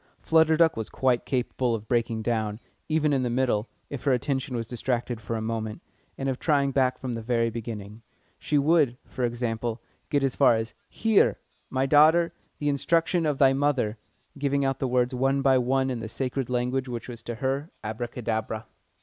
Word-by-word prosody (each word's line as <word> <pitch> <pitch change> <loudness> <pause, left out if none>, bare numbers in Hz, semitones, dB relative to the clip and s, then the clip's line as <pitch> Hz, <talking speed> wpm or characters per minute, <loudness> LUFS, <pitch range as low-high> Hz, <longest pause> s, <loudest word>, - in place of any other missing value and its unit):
Flutter 160 -1 +4
Duck 165 -1 +4
was 110 -1 -4
quite 125 -2 +1
capable 125 -2 0
of 110 -1 -7
breaking 115 -2 0
down, 110 -2 -1 0.3
even 155 -1 +2
in 135 - +2
the 125 - 0
middle, 120 -3 +1 0.2
if 140 -4 -7
her 140 - +2
attention 130 +1 -1
was 115 -1 -2
distracted 120 -1 -2
for 115 +2 -4
a 110 - -3
moment, 110 -1 -3 0.4
and 135 - -3
of 130 -1 -1
trying 140 -3 +2
back 130 -1 +2
from 130 -2 -4
the 115 - -4
very 115 0 +1
beginning. 110 -2 -7 0.4
She 150 - 0
would, 145 -4 +3
for 130 - -5
example, 120 -1 -2 0.3
get 145 -1 +1
as 135 -2 0
far 135 -4 +5
as 110 0 -3 0.2
"Hear 220 -2 +3 0.3
my 130 0 0
daughter 160 +4 +5 0.2
the 145 - -3
instruction 165 +3 +1
of 145 -2 0
thy 135 -1 +5
mother," 135 -6 0 0.4
giving 140 0 +1
out 135 -1 0
the 135 - 0
words 125 0 +1
one 135 +2 +1
by 130 -1 +5
one 130 +1 +1
in 125 - -3
the 110 -1 -6
sacred 130 +1 -3
language 125 +2 0
which 120 -2 -5
was 120 -2 -8
to 120 - -5
her 135 +5 -2
abracadabra. 110 -1 -3
125 Hz, 190 wpm, -26 LUFS, 115-140 Hz, 0.4 s, far